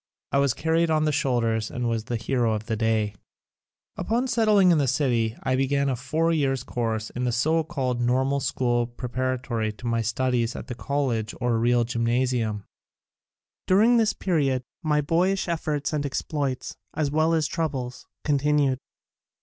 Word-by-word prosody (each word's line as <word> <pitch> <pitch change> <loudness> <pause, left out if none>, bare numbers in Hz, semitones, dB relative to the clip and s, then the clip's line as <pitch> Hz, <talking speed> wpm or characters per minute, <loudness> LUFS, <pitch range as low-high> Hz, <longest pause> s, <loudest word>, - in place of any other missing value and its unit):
I 140 - +3
was 140 -3 +2
carried 165 +1 +1
on 155 -1 +2
the 155 - +2
shoulders 120 -7 0
and 120 -1 -3
was 115 -1 -1
the 120 - -2
hero 115 0 0
of 105 0 -5
the 110 -1 -1
day. 110 -1 +1 0.8
Upon 240 +4 0
settling 215 -6 +4
in 165 - +4
the 140 - +1
city 120 -5 +1
I 130 -1 +1
began 140 +1 +1
a 130 - 0
four 155 +7 0
years' 135 -5 +1
course 110 -2 -2
in 125 - -4
the 125 - +1
so 160 +8 +2
called 130 -7 -2
Normal 130 +3 +1
School 120 -3 0
preparatory 125 -2 -2
to 115 - -13
my 115 -1 +1
studies 120 +1 0
at - - -6
the 125 - -5
College 120 -2 -2
or 120 -2 +1
Real 120 +1 +3
Gymnasium. 115 -2 0 1.0
During 220 +6 +5
this 220 -2 +3
period 140 -10 0 0.2
my 150 -3 +2
boyish 180 +7 +1
efforts 155 -4 -2
and 150 -1 0
exploits, 140 -1 -3 0.2
as 150 -2 0
well 160 +2 +2
as 160 -2 +1
troubles, 135 -7 -3 0.2
continued. 145 -2 +2
130 Hz, 165 wpm, -25 LUFS, 120-150 Hz, 1.0 s, During